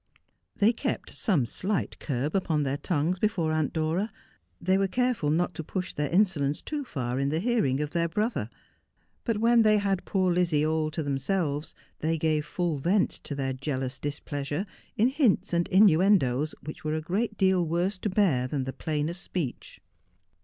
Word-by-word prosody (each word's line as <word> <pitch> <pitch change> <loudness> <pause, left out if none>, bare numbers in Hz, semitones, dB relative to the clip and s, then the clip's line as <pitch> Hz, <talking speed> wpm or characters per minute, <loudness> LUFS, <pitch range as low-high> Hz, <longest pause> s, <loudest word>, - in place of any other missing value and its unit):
They 215 +4 +4
kept - - -3
some 170 - +1
slight 195 - -2
curb 140 +3 -2
upon 160 -6 +1
their 140 0 -1
tongues 165 +4 0
before 180 -7 +1
Aunt 155 -2 0
Dora; 165 +7 -1 0.5
they 185 +2 +2
were 195 0 +2
careful 245 -7 0
not 175 +4 +1
to 160 - -5
push 185 +3 -4
their 145 -1 -1
insolence 170 -7 +2
too 300 -2 -3
far 130 - -3
in 140 0 +1
the 155 +2 0
hearing 180 - +1
of 150 0 -3
their 170 -1 0
brother. 215 +7 -1 0.8
But 230 -3 0
when 230 +2 +5
they 215 -1 +5
had 195 -2 0
poor 185 -2 +1
Lizzie 170 -4 +2
all 155 0 +1
to 155 +1 -3
themselves 145 +2 -1 0.2
they 160 +1 0
gave 155 -1 0
full 175 -3 -1
vent 185 +7 +2
to 145 - -6
their 135 -1 -1
jealous 130 -1 -3
displeasure, 145 +3 -3 0.3
in 230 +4 +4
hints 245 - +2
and 170 0 +2
innuendoes 175 - +4
which 155 +2 -8
were 155 0 -1
a 160 - -2
great 210 +7 -2
deal 190 -2 +3
worse 175 +4 -1
to 210 - -1
bear 180 -11 +2
than 135 0 -2
the 130 0 -4
plainest 155 +5 -2
speech. 155 -9 -5
165 Hz, 175 wpm, -27 LUFS, 145-195 Hz, 0.8 s, when